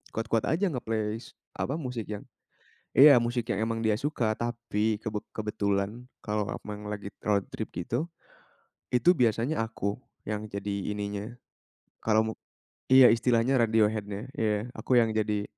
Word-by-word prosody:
kuat-kuat 115 0 0
aja 175 +3 +1
nge-play 110 -3 -2
s - - -14 0.2
apa, 135 - -3
musik 125 -8 -4
yang 105 -1 -5 0.7
iya, 140 -1 +9
musik 120 0 -1
yang 110 +2 0
emang 115 0 -2
dia 110 -2 +2
suka. 115 -6 -1
Tapi 110 -2 -1
kebet 105 -1 -4
kebetulan 105 +2 -2 0.2
kalau 105 -1 -1
aku - - -7
memang 105 0 -6
lagi 100 -1 -6 0.2
road 100 -2 +1
trip - - -6
gitu, 120 - -2 0.8
itu 160 +9 +4
biasanya 120 +1 +1
aku, 100 -3 -3 0.4
yang 105 0 -3
jadi 100 0 -4 0.2
ininya, 105 +1 -4 0.7
kalau 110 0 +4
mau - - -23 0.5
iya, 130 -1 +8
istilahnya 120 +2 +2
radio 110 -2 +4
head-nya. 105 +1 -5
Iya, 110 +2 0
aku 125 - +1
yang 115 -1 +2
jadi 105 -1 0
110 Hz, 150 wpm, -28 LUFS, 105-120 Hz, 0.8 s, iya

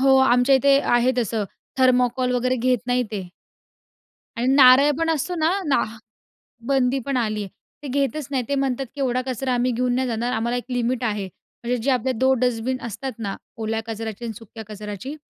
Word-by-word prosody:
हो, 270 0 +5
आमच्या 265 0 +4
इथे 275 +1 +4
आहे 240 +1 +4
तसं, 225 -2 -1 0.3
थर्मोकॉल 250 0 +3
वगैरे 255 +1 +1
घेत 250 +1 +1
नाही 250 0 +2
ते. 190 -4 -4 1.1
आणि 235 +2 -1
नारळ 270 +1 +7
पण 330 0 +1
असतो 325 +3 -1
ना, 320 -1 +1 0.2
ना 275 -5 +2 0.8
बंदी 270 -1 +2
पण 275 -2 -1
आली 215 -3 -1
आहे. 195 - -8 0.3
ते - - -5
घेतच 275 +1 -1
नाही. 260 -3 0
ते 280 - +1
म्हणतात 270 -1 -1
की, - - -9
"एवढा 255 -1 +1
कचरा 260 0 -2
आम्ही 245 +1 +1
घेऊन 245 +1 0
नाही 260 0 0
जाणार 235 +1 -2
आम्हाला 235 +2 -1
एक 245 - -4
लिमिट 245 0 -1
आहे. 210 -4 -1 0.4
म्हणजे 245 +1 0
जे 275 - +2
आपले 255 0 +1
2 260 +2 +2
डस्टबिन 250 +1 0
असतात 240 +5 -5
ना, 200 -3 -3 0.2
ओल्या 225 0 -2
कचऱ्याची 225 0 -5
आणि 225 - -4
सुक्या 225 -1 -11
कचऱ्याची, 210 +5 -7
250 Hz, 190 wpm, -23 LUFS, 230-265 Hz, 1.1 s, नारळ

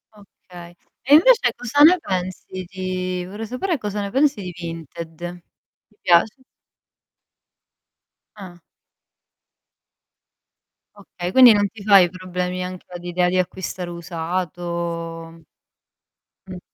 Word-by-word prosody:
Okay. 175 -4 -15 0.3
E 275 - +3
invece 485 +9 +5
cosa 245 +4 0
ne 345 +4 +8
pensi 185 - -5
di 185 -1 -4
vorrei 205 +4 -7
sapere 300 - -2
cosa 210 -3 -4
ne 200 - -4
pensi 275 -4 +2
di 180 -2 -6
Vinted. 170 +1 -8 0.5
Ti 210 - -32
piace? 180 +9 +3 1.9
Ah. 185 -4 -11 2.4
Okay, 185 -3 -7
quindi 250 0 +8
non 205 -1 +2
ti 205 +1 -13
fai 195 -4 +6
problemi 180 0 -4
anche 185 0 -8
all'idea 175 0 -1
di 185 - 0
acquistare 185 0 -3
usato? 170 -1 -5 1.0
Mh. 185 -1 -8
185 Hz, 105 wpm, -21 LUFS, 175-205 Hz, 2.4 s, ne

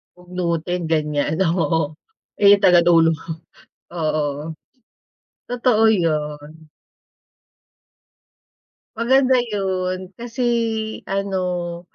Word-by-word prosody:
Bugnutin 180 -1 -3
ganiyan, 150 +1 0
oo. 165 -1 +1 0.6
Eh, 200 0 +8
tagadulo, 170 -3 +5 0.8
oo. 155 -1 -2 0.9
Totoo 240 -2 +2
'yun. 155 -3 -3 2.3
Maganda 255 +2 +3
yun. 185 -4 -3
Kasi 240 +3 -4 0.6
ano, 180 -3 -2
180 Hz, 60 wpm, -21 LUFS, 160-200 Hz, 2.3 s, Eh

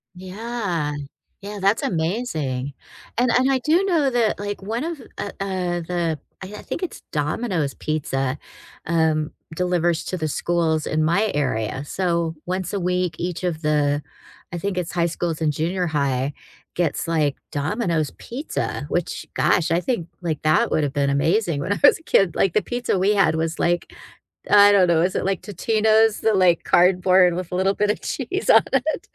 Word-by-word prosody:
Yeah. 185 -5 -3 0.5
Yeah, 205 0 -7
that's 195 +3 +2
amazing. 160 - -2 0.4
And 245 0 +3
and 260 +2 +3
I 265 - +3
do 325 +8 +2
know 330 -8 +2
that, 235 -4 +1
like, 205 0 -4
one 225 +6 -3
of 330 -5 -5 0.2
uh, 200 - -4
uh, 180 -3 -2
the 165 -2 -2 0.2
I 190 - -6
I - - -9
think - - -5
it's 365 - -5
Domino's 150 - -1
pizza, 135 -3 -2 0.5
um, 160 -2 +1 0.2
delivers 175 -2 0
to 185 - -3
the 155 -1 -2
schools 160 -1 0
in 155 0 +1
my 200 +7 +2
area. 130 -3 -1
So 170 -2 -1
once 185 +1 -3
a 200 - 0
week, 180 -1 0
each 175 +1 -3
of 165 -3 -2
the 145 -1 +1 0.5
I 175 - -2
think 195 0 -3
it's 180 -1 -2
high 170 -1 +1
schools 165 -1 -3
and 155 -1 +2
junior 175 +4 -1
high, 140 -2 0 0.4
gets 165 -2 -1
like 150 -4 +1 0.2
Domino's 160 - -1
pizza, 270 +6 -4
which, - - -2
gosh, 170 -1 +2
I 170 - +3
think 205 -10 -2
like 160 -3 -2
that 165 +10 +3
would've 145 -3 0
been 140 -1 +1
amazing 165 +3 +1
when 185 +7 -1
I - - -5
was 285 - +7
a - - -21
kid. 195 - +2
Like, 190 - +2
the 215 - +3
pizza 245 -3 -2
we 205 +2 +3
had 195 -5 +4
was 160 +1 -2
like 175 0 0 0.6
I 205 0 +8
don't 195 -3 +5
know, 165 -2 +3
is 185 +1 0
it - - -1
like 195 -2 0
Totino's, 220 +2 +2
the, 220 - +2
like, 180 -3 +3
cardboard 180 0 +4
with 180 -1 -5
a - - -1
little 195 +2 +2
bit 210 0 +1
of - - -1
cheese 380 +3 -3
on - - +8
it. 290 +4 +1
175 Hz, 180 wpm, -22 LUFS, 155-205 Hz, 0.6 s, I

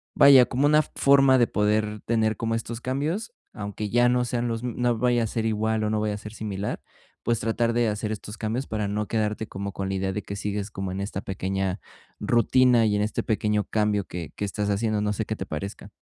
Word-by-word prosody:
vaya, 135 -3 +8
como 140 +4 +2
una 150 +1 +5
forma 135 -2 +4
de 120 - +4
poder 105 0 0
tener 110 -2 +1
como 115 0 -1
estos 115 +1 -5
cambios, 155 - -2 0.2
aunque 105 -1 -5
ya 120 +3 +4
no 125 0 +2
sean 120 0 -1
los 115 0 -2
m 125 -2 -3
no 120 -2 +1
vaya 120 -2 +2
a - - -1
ser 110 +1 -2
igual, 110 0 0
o 105 - 0
no 110 - +1
vaya 105 -1 0
a - - -5
ser 105 +1 -9
similar, 105 -2 -4 0.4
pues, 115 -1 +1
tratar 115 +1 0
de 120 -1 +2
hacer 105 +1 -3
estos 105 0 -6
cambios 115 +5 -2
para 105 -2 -2
no 105 +1 -2
quedarte 110 -1 -1
como 100 +1 -5
con 95 -1 -3
la 95 - -1
idea 95 0 -1
de 105 - -3
que 100 - -6
sigues 100 0 -3
como 95 -2 -4
en 95 - -4
esta 100 -1 -4
pequeña 95 0 -2 0.4
rutina 120 0 +4
y 105 - +2
en 105 - +1
este 105 - -2
pequeño 105 -1 0
cambio 105 -2 +1
que 85 -2 -6
que 105 - -2
estás 100 +1 -2
haciendo. 105 +1 0
No 105 0 0
sé 110 +1 -2
qué 110 - -3
te 95 - -6
parezca. 100 +6 -6
110 Hz, 230 wpm, -25 LUFS, 105-120 Hz, 0.4 s, vaya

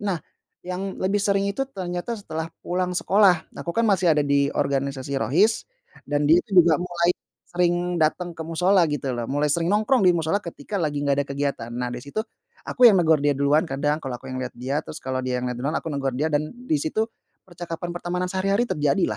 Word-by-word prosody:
Nah, 195 -4 0 0.4
yang 185 +2 -5
lebih 200 +2 +1
sering 200 -1 +2
itu 270 +7 -1
ternyata 180 +2 -4
setelah 160 -4 -5 0.2
pulang 180 0 -1
sekolah, 195 -4 +3
nah, - - -8
aku, 170 - -2
kan, 230 - +3
masih 190 -4 +3
ada - - +3
di 140 0 +3
organisasi 140 -1 -1
Rohis, 185 - +2 0.4
dan 145 0 +1
dia, 170 +3 +6
tuh, 195 -5 +2
juga 160 -3 +4
mulai 175 -1 +1 0.4
sering 175 0 0
dateng 175 +2 0
ke 160 - -5
mushola, 180 +3 +3
gitu, 140 -2 -2
loh, 120 - -3
mulai 145 +2 +1
sering 170 +4 +1
nongkrong 215 +3 +3
di 180 - +7
mushola 165 +4 +1
ketika 170 +4 -5
lagi 150 -4 -1
nggak 140 -1 +1
ada - - -11
kegiatan. 140 -4 -3
Nah, 125 0 -3
dari 120 - -5
situ, 180 +10 -3 0.4
aku 250 -1 +4
yang 220 - +8
negur 160 -2 +4
dia 145 0 +1
duluan 140 +4 +2
kadang 145 +2 -1
kalau 135 -5 -5
aku 130 - -9
yang 130 - -4
lihat 130 -1 -5
dia, 135 +4 -2
terus - - -7
kalau 130 0 -2
dia 125 -1 -1
yang 125 - -2
liat 125 - -5
duluan, 145 +5 -2
aku - - -2
negur 135 -3 -2
dia, 155 +5 0
dan 150 +1 0
di 245 -11 -1
situ 220 +10 -1 0.3
percakapan 175 -1 -6
pertemanan 180 +1 -3
sehari-hari 195 +5 0
terjadi, 145 -2 +1
165 Hz, 215 wpm, -24 LUFS, 140-185 Hz, 0.4 s, yang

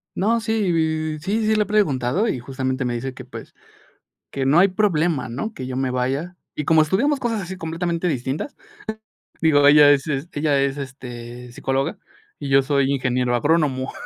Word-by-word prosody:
No, 225 +4 +2
sí, 160 -8 0
sí, 215 +6 -1
sí 220 0 +3
le 215 - +3
he - - -10
preguntado 190 - +1
y 130 - -1
justamente 130 +1 -3
me 125 -1 -1
dice 130 +2 -4
que, - - -10
pues, - - -10 0.8
que 135 -1 -2
no 145 +5 +5
hay 195 +2 +5
problema, 170 - +1
¿no? 140 - -4
Que 130 -7 -6
yo 130 - -4
me 130 0 -1
vaya. 135 +8 -2 0.2
Y 150 - -2
como 160 +1 +5
estudiamos 265 - +1
cosas 230 -4 -1
así 190 +1 -6
completamente 170 +1 -2
distintas, 135 - -3 0.9
digo, 145 -3 +5
ella 145 0 +8
es 140 +1 +2 0.2
ella 145 -2 +1
es, 140 0 0
este, 125 -3 -8
psicóloga 135 +2 -2 0.4
y 145 - -5
yo 135 0 +5
soy 140 0 +1
ingeniero 125 -2 0
agrónomo. 140 -1 +1
145 Hz, 175 wpm, -22 LUFS, 130-175 Hz, 0.9 s, ella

